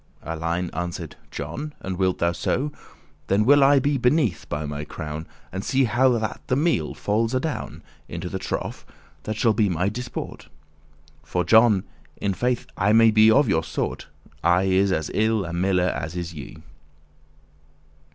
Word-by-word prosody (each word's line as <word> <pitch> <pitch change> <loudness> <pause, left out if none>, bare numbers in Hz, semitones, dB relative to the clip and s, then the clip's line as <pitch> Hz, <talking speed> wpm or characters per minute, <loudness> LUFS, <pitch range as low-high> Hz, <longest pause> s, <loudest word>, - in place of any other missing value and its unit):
Alein 85 +2 -2
answered, 85 0 -5
"John, 85 - -6
and 95 0 -4
wilt 95 0 +1
thou 85 0 +1
so? 135 - -1 0.6
Then 100 +2 +2
will 145 +2 +6
I 140 +1 +6
be 140 +1 +1
beneathe, 125 - +1
by 75 +1 -3
my 75 0 -4
crown, 75 +1 -6 0.2
And 95 +2 -4
see 135 +3 +2
how 125 +3 +3
that 110 -1 -3
the 130 - +1
meale 160 +4 +1
falls 115 +4 0
adown 150 +4 -3 0.3
Into - - -5
the - - -4
trough, - - -4 0.4
that 110 - -2
shall 115 -1 +3
be 105 -2 +2
my 90 +2 0
disport*: 125 +3 -6
*amusement - - -26 0.7
For, 90 - -1
John, 110 -3 +5 0.3
in 100 -1 -1
faith 125 +4 -1
I 105 +3 +2
may 115 0 +6
be 110 0 +6
of 135 +4 +5
your 100 - +2
sort; - - -4 0.4
I 90 +2 +4
is 95 +1 +2
as 80 -4 -1
ill 110 -2 +1
a 85 - -5
miller 90 0 +2
as 75 +4 -5
is 85 -1 -4
ye." 75 -4 -9
100 Hz, 170 wpm, -24 LUFS, 85-120 Hz, 0.7 s, will